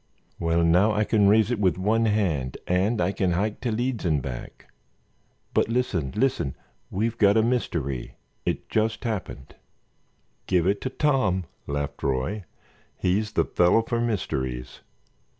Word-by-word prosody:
"Well, 85 0 +2
now 90 +6 +4
I 105 +1 +2
can 105 -2 +3
raise 110 +3 +4
it 120 - -1
with 95 -5 +2
one 110 +4 +2
hand 90 - 0
and 95 +6 +1
I 90 +2 +2
can 95 -3 0
hike 105 +4 -1
to 120 - -1
Leeds 120 +2 -1
and 80 -5 +2
back. 65 -2 -8 0.8
But - - +3
listen—listen; 115 - 0 0.3
we've 115 +4 -2
got 100 0 +5
a 110 - +4
mystery—it 80 - -3
just 110 0 0
happened——" 100 - -4 0.9
"Give 90 -3 +2
it 100 +2 +1
to 130 - -2
Tom," 130 -10 +1 0.2
laughed 70 0 -3
Roy. 70 +10 -1 0.5
"He's 105 +4 0
the - - +2
fellow 90 +6 +3
for 115 0 -1
mysteries." 65 - -3
100 Hz, 140 wpm, -25 LUFS, 85-110 Hz, 0.9 s, got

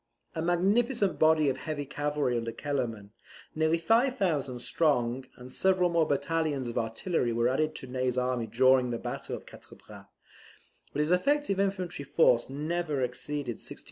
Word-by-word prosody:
A 160 - -3
magnificent 200 +4 +1
body 155 -1 +4
of 135 -1 0
heavy 145 +1 -4
cavalry 145 -2 -1
under 115 -1 -2
Kellerman, 115 -7 -3 0.4
nearly 160 +1 +2
5,000 190 - +1
strong, 125 -2 0
and 125 +1 -11
several 185 -2 +3
more 165 -2 +2
battalions 145 -1 -1
of 120 - -5
artillery 120 +4 -1
were 115 +1 +1
added 155 +5 0
to - - -6
Ney's 130 0 -2
army 125 -2 0
during 130 +2 +4
the 120 - -2
battle - - -5
of - - -10
Quatre - - -14
Bras; - - -14 0.8
but - - -1
his 150 +3 0
effective 200 +2 +2
infantry 185 -6 -1
force 140 -4 +3
never 150 0 -2
exceeded 125 0 -3
16,000. - - -7
145 Hz, 155 wpm, -29 LUFS, 125-170 Hz, 0.8 s, body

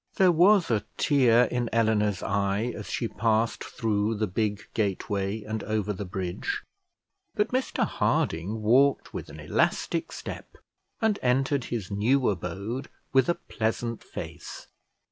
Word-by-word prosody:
There 185 -2 +5
was 180 0 +5
a 105 -2 +2
tear 125 -5 +5
in 125 -1 -1
Eleanor's 110 -3 +2
eye 100 +4 0
as - - -7
she 115 - -1
passed 115 0 0
through 110 -1 -1
the 110 +1 0
big 105 +1 -1
gateway 100 0 -1
and 110 0 -4
over 105 -1 -1
the 100 +1 -5
bridge; 90 0 -3 0.7
but 210 - +1
Mr 255 +1 0
Harding 100 +7 0
walked 135 +6 +3
with - - -6
an - - -10
elastic - - 0
step, - - -8 0.5
and 220 -2 +2
entered 135 +1 +1
his 110 -6 -4
new 120 +6 +2
abode 100 +7 -4 0.2
with 135 +1 +4
a 170 - +3
pleasant 115 -5 -3
face. - - -8
110 Hz, 140 wpm, -27 LUFS, 105-125 Hz, 0.7 s, There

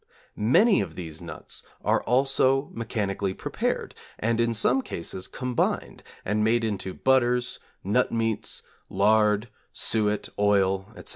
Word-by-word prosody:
Many 175 - +4
of 85 -5 -5
these 80 -3 -7
nuts 85 - -5 0.2
are - - +3
also 135 +2 +2
mechanically 100 -4 -2
prepared, - - -2 0.2
and 115 +1 0
in 115 0 +2
some 120 +4 +3
cases 90 -3 -5
combined, 125 -2 -2 0.2
and 105 +2 +1
made 115 +2 +2
into 100 -4 -3
butters, 125 -2 +2 0.2
nut 105 +6 +1
meats, 115 -2 0 0.3
lard, 105 +2 +3 0.2
suet, 105 -1 0
oil, 95 -2 +2
etc. - - -8
110 Hz, 125 wpm, -26 LUFS, 100-120 Hz, 0.3 s, Many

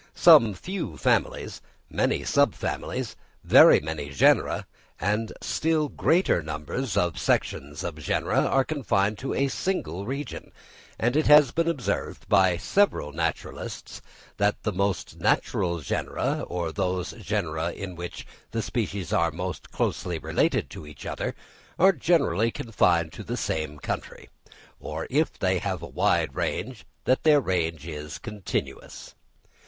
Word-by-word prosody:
Some 110 -4 +7
few 170 - -5
families, - - 0 0.3
many - - 0
subfamilies, - - 0 0.3
very - - +8
many 75 -2 -5
genera, 70 - +3 0.3
a 105 +3 0 0.2
still 155 -2 +1
greater 170 - +2
number 75 -1 -6
of 100 - 0
sections 75 +1 -1
of 85 -3 -4
genera, 75 - 0
are 135 - +3
confined 105 -8 0
to 135 - -3
a 140 - +2
single 105 - -3
region; 140 +1 -5 0.5
and 120 +3 0
it 155 - +2
has 150 -3 +7
been 165 0 0
observed 155 -7 -2
by 95 -3 +4
several 105 - +1
naturalists 80 +1 -4 0.4
that 105 0 +1
the 105 - 0
most 100 0 -2
natural 85 -2 +1
genera, - - -2
or 85 -2 -3
those 90 +2 -2
genera 85 -6 -2
in 95 -1 -7
which 85 0 -7 0.2
the 115 -1 -2
species 100 -6 -3
are 85 - +3
most 90 +3 -5
closely - - -1
related - - 0
to 75 - -9
each 75 -1 -11
other, - - -3 0.4
are 190 +3 +6
generally 140 - +2
confined 85 -9 +1
to - - -8
the - - -4
same 75 -2 -2
country, - - -6 0.5
or - - -5
if - - +1
they - - +1
have - - -3
a - - -5
wide - - +1
range 105 -3 -3 0.2
that 130 - +2
their 150 -2 +5
range 85 - -1
is 75 -2 -6
continuous. 105 -5 -5
95 Hz, 135 wpm, -26 LUFS, 85-130 Hz, 0.5 s, very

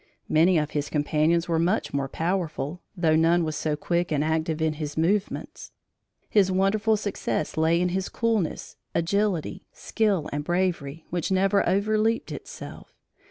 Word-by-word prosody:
Many 170 +3 +4
of 150 -1 0
his 145 -1 -2
companions 155 +3 +1
were 165 -2 +1
much 175 +2 0
more 140 -1 -1
powerful, 165 -1 -2 0.2
though 160 -3 +3
none 165 +2 +4
was 155 -1 -2
so 150 0 -1
quick 170 +3 -1
and 150 -1 +1
active 160 0 -1
in 160 -1 +1
his 150 0 -4
movements. 190 +5 -1 0.5
His 195 -3 +3
wonderful 205 +3 +2
success 200 -6 -2
lay 160 +2 +3
in 180 0 +1
his 190 +1 -2
coolness, 225 -8 -1 0.2
agility, 190 +1 0
skill 205 -8 0
and 145 0 -2
bravery, 165 -3 -1
which 175 -2 -1
never 195 +1 +3
"overleaped 215 +4 +1
itself." - - -9
170 Hz, 150 wpm, -25 LUFS, 155-195 Hz, 0.5 s, Many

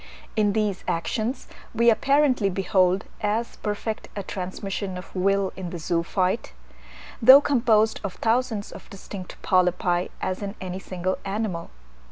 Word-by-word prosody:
In 210 -2 +2
these 210 -3 -1
actions 220 +9 -2 0.3
we 235 +1 +5
apparently 275 -3 +3
behold 190 0 +2 0.2
as 220 +3 -1
perfect 215 +1 -4
a 200 - -3
transmission 190 +1 -4
of 180 - -11
will 195 +1 +1
in 185 -2 -5
the 175 - -5
zoophyte, 170 - -1 0.7
though 260 +4 +10
composed 230 -6 +2
of 200 -3 -4
thousands 225 -2 0
of - - -12
distinct 195 -2 -9
polypi, 180 -1 +2
as 185 +1 -3
in 200 0 -5
any 185 0 -5
single 185 0 -3
animal. 195 -4 -3
200 Hz, 135 wpm, -25 LUFS, 185-220 Hz, 0.7 s, though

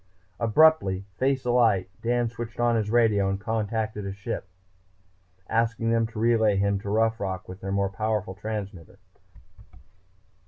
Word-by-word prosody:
Abruptly, 115 -6 +3
face 135 0 +1
alight, 115 -6 +3
Dan 120 0 +1
switched 115 0 -7
on 120 -1 +3
his 110 -2 0
radio 110 -4 +3
and 95 0 -2
contacted 110 0 -2
a 100 - -4
ship 95 -1 -5 0.9
below, 95 +4 -4
asking 115 0 0
them 115 -1 +2
to 110 - -12
relay 110 -2 +3
him 100 0 +1
to 100 - -6
Rough 115 +2 +1
Rock 95 -1 -4
with 90 +2 -10
their 95 - -4
more 100 -1 0
powerful 105 -1 -2
transmitter. 100 -4 -6
110 Hz, 150 wpm, -26 LUFS, 100-115 Hz, 0.9 s, Abruptly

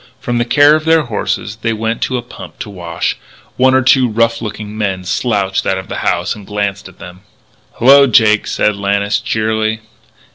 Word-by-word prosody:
From 120 -3 -2
the 120 - 0
care 145 +4 +5
of 155 - -2
their 160 0 +3
horses 110 -2 -3
they 115 +1 -2
went 115 +1 -3
to 130 - -1
a 120 - -5
pump 120 - -12
to 105 - -7
wash. 85 -3 -4 0.4
One 130 +1 +3
or 130 - +3
two 130 -1 +4
rough 115 +1 0
looking 105 -1 -6
men 95 -4 -3
slouched 95 0 -1
out 95 - +1
of 95 - -8
the - - -4
house 85 - -1
and 105 - -11
glanced 100 -1 -3
at 95 - -20
them. 90 +1 -12 0.6
"Hallo, 140 +3 +6
Jake," 110 -4 +3
said 105 - 0
Lannis 100 +1 0
cheerily. 110 0 -1
110 Hz, 190 wpm, -15 LUFS, 100-120 Hz, 0.6 s, Hallo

